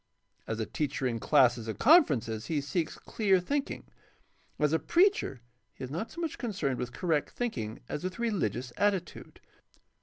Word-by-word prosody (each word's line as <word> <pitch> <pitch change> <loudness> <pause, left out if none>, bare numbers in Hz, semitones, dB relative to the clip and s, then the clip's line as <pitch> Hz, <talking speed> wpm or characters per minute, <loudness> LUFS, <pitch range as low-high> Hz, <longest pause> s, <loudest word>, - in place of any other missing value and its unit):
As 110 - -3
a 110 - -1
teacher 145 0 -2
in 115 -2 0
classes 120 -4 +3
and 110 - -4
conferences 125 - +4
he 155 - 0
seeks 155 +4 -2
clear 195 -4 +1
thinking. 280 +10 -2 0.7
As 150 0 +2
a 160 - +3
preacher 345 - +2 0.3
he - - -9
is 130 - -6
not 180 +9 -3
so 340 - -7
much 330 -3 -3
concerned 180 - -2
with 125 - -3
correct 160 -3 0
think 240 -2 -3
ing 110 -2 -5
as 150 - -4
with 185 0 -3
rehgious 140 - -1
attitude. 195 -4 -1
155 Hz, 170 wpm, -30 LUFS, -, 0.7 s, conferences